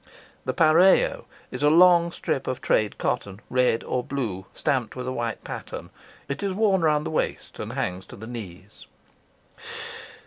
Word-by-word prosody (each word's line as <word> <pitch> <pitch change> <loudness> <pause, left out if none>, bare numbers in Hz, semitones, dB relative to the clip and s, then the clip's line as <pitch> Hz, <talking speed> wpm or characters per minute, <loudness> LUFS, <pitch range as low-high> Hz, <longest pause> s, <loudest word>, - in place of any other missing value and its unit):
The 180 - +4 0.3
is - - -5
a 145 - +5
long 170 +1 +6
strip 135 - -2
of 130 - -2
trade 105 -1 +1
cotton, 100 0 -2
red 125 -2 +2
or 125 - -1
blue, 110 -10 -4
stamped 125 -5 -1
with 125 0 -5
a - - -1
white 120 -2 -3
pattern. - - -7 0.4
It 140 0 -4
is 195 -1 -1
worn 195 -2 +3
round 150 -2 +2
the - - -3
waist 155 - -2
and - - -5
hangs 90 +1 -3
to - - -10
the 110 - -9
knees. 105 -4 -9
130 Hz, 160 wpm, -25 LUFS, 110-170 Hz, 0.4 s, long